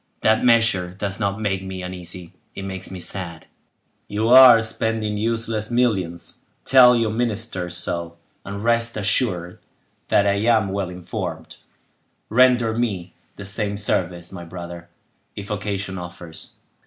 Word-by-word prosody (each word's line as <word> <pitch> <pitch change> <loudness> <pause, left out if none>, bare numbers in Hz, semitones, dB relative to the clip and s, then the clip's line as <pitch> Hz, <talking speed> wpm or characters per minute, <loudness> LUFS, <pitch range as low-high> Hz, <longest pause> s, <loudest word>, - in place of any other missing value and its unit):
That 110 0 +3
measure 115 -7 +3
does 100 -1 -4
not 100 -1 -1
make 100 -3 -1
me 95 -1 -6
uneasy, 90 -1 -7 0.2
it 95 - -6
makes 95 -1 -5
me 95 - -7
sad. 85 -2 -6 0.6
You 110 +2 -1
are 125 -2 +9
spending 110 -1 -1
useless 115 0 -1
millions; 100 -9 -1 0.3
tell 125 -2 +7
your 115 -2 +1
ministers 110 -6 -2
so; 85 -1 -3 0.3
and 100 +1 -6
rest 115 0 +1
assured 95 -4 -1 0.5
that 100 - +3
I 100 0 +2
am 110 -2 +2
well 95 -2 -2
informed; 90 -2 -6 0.7
render 120 -1 +4
me 100 -7 -2 0.2
the 100 - -9
same 100 +1 -1
service, 90 -4 -1
my 90 -3 -8
brother, 85 0 -9 0.5
if 100 +1 -7
occasion 100 -2 -3
offers." 85 -2 -9
100 Hz, 135 wpm, -22 LUFS, 90-115 Hz, 0.7 s, are